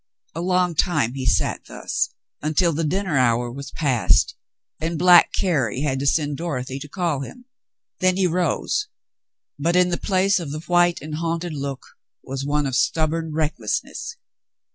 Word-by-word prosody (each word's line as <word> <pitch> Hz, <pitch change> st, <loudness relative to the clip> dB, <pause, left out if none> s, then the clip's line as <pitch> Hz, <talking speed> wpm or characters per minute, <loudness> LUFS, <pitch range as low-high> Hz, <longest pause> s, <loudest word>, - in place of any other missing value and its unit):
A 165 Hz, -, -4 dB
long 180 Hz, -1 st, +1 dB
time 150 Hz, -8 st, +1 dB
he 130 Hz, -1 st, -4 dB
sat -, -, +1 dB
thus, -, -, -2 dB, 0.3 s
until 160 Hz, +3 st, +2 dB
the 165 Hz, +3 st, -1 dB
dinner 180 Hz, 0 st, 0 dB
hour 120 Hz, -1 st, +2 dB
was 140 Hz, +3 st, -7 dB
past, 135 Hz, -7 st, +2 dB, 0.4 s
and 165 Hz, +1 st, -2 dB
black 175 Hz, +1 st, +7 dB
Carrie 140 Hz, -, 0 dB
had 135 Hz, -3 st, 0 dB
to 140 Hz, -, -1 dB
send 145 Hz, -1 st, +1 dB
Dorothy 135 Hz, -5 st, -4 dB
to 150 Hz, -, -8 dB
call 170 Hz, -4 st, -1 dB
him. 245 Hz, -, -9 dB, 0.5 s
Then 185 Hz, -1 st, +2 dB
he 190 Hz, -, +2 dB
rose, 180 Hz, -, 0 dB, 0.7 s
but 170 Hz, +4 st, +1 dB
in 180 Hz, 0 st, +4 dB
the 175 Hz, -, 0 dB
place 195 Hz, 0 st, +2 dB
of 165 Hz, -4 st, -5 dB
the 155 Hz, +1 st, -5 dB
white 175 Hz, 0 st, +3 dB
and 155 Hz, 0 st, -6 dB
haunted 165 Hz, +1 st, -2 dB
look 140 Hz, -2 st, -4 dB, 0.4 s
was 135 Hz, 0 st, -5 dB
one 145 Hz, +1 st, 0 dB
of 135 Hz, -2 st, -1 dB
stub 155 Hz, +5 st, +2 dB
born 165 Hz, -1 st, -3 dB
recklessness. 150 Hz, -8 st, -3 dB
155 Hz, 165 wpm, -22 LUFS, 140-175 Hz, 0.7 s, black